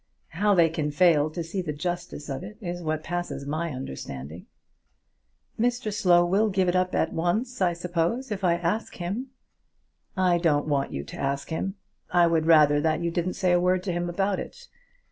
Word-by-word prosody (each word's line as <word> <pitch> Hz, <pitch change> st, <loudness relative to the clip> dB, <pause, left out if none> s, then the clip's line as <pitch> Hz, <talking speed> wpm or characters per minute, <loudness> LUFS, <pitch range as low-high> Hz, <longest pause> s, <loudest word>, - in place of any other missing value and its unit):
How 200 Hz, +4 st, +2 dB
they 170 Hz, -2 st, +6 dB
can 155 Hz, -2 st, -2 dB
fail 155 Hz, -1 st, +4 dB
to 170 Hz, +2 st, -4 dB
see 175 Hz, +4 st, -3 dB
the 155 Hz, -4 st, -4 dB
justice 175 Hz, -1 st, -4 dB
of 135 Hz, +1 st, -4 dB
it 210 Hz, +2 st, -9 dB
is 175 Hz, -4 st, -5 dB
what 155 Hz, -1 st, -2 dB
passes 175 Hz, -4 st, -4 dB
my 155 Hz, +4 st, -2 dB
understanding!" 75 Hz, -, -7 dB, 1.1 s
"Mr 240 Hz, -2 st, 0 dB
Slow 175 Hz, -3 st, +4 dB
will 200 Hz, +5 st, +2 dB
give 190 Hz, -2 st, +1 dB
up 185 Hz, +1 st, +1 dB
at -, -, +1 dB
once, 215 Hz, +9 st, -1 dB
I 175 Hz, -2 st, +3 dB
suppose, 180 Hz, +9 st, -2 dB
if 200 Hz, -1 st, -3 dB
I 175 Hz, -2 st, +4 dB
ask 175 Hz, +6 st, -2 dB
him?" 195 Hz, +9 st, -4 dB, 0.9 s
"I 180 Hz, -2 st, +3 dB
don't 150 Hz, -4 st, +2 dB
want 140 Hz, -2 st, 0 dB
you 70 Hz, -, -4 dB
to -, -, -10 dB
ask 140 Hz, +2 st, -2 dB
him. 190 Hz, +4 st, -2 dB, 0.3 s
I 175 Hz, -1 st, +4 dB
would 165 Hz, -1 st, +1 dB
rather 150 Hz, -3 st, +6 dB
that 155 Hz, +1 st, +1 dB
you 170 Hz, -, 0 dB
didn't 175 Hz, +1 st, -1 dB
say 185 Hz, -2 st, +1 dB
a 175 Hz, 0 st, +4 dB
word 180 Hz, 0 st, +2 dB
to 185 Hz, -, -2 dB
him 175 Hz, 0 st, -2 dB
about 195 Hz, +2 st, 0 dB
it. -, -, -9 dB
175 Hz, 190 wpm, -26 LUFS, 155-185 Hz, 1.1 s, they